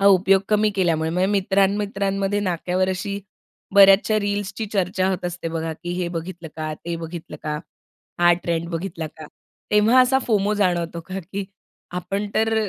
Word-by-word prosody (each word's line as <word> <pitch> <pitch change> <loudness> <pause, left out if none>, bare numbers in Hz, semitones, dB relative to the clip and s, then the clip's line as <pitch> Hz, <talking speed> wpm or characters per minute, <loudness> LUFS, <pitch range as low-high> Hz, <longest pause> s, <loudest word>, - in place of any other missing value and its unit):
हा 200 - +4
उपयोग 195 0 +5
कमी 210 0 +3
केल्यामुळे 165 -4 +1
म्हणजे 180 +3 +1
मित्रांमित्रांमध्ये 195 0 +1
नाक्यावर 185 0 0
अशी 200 +2 -3 0.5
बऱ्याचशा 200 +2 +6
रील्सची 205 +1 -2
चर्चा 185 -1 +1
होत 185 -1 -3
असते, 175 -1 -3
बघा 165 0 -3
की 175 +2 -7
"हे 175 - -1
बघितलं 170 0 -6
का, 155 -1 -3
ते 170 +2 -5
बघितलं 165 0 -7
का? 150 -1 -2 0.6
हा 175 0 +6
ट्रेंड 170 0 -1
बघितला 165 -1 -4
का?" 155 0 -11 0.5
तेव्हा 220 +5 +6
असा 260 +1 +4
फोमो 210 -2 +2
जाणवतो 175 -4 0
का 190 +1 -4
की 200 0 -2 0.5
आपण 195 +3 -3
तर 225 0 +2
190 Hz, 155 wpm, -22 LUFS, 170-200 Hz, 0.6 s, बऱ्याचशा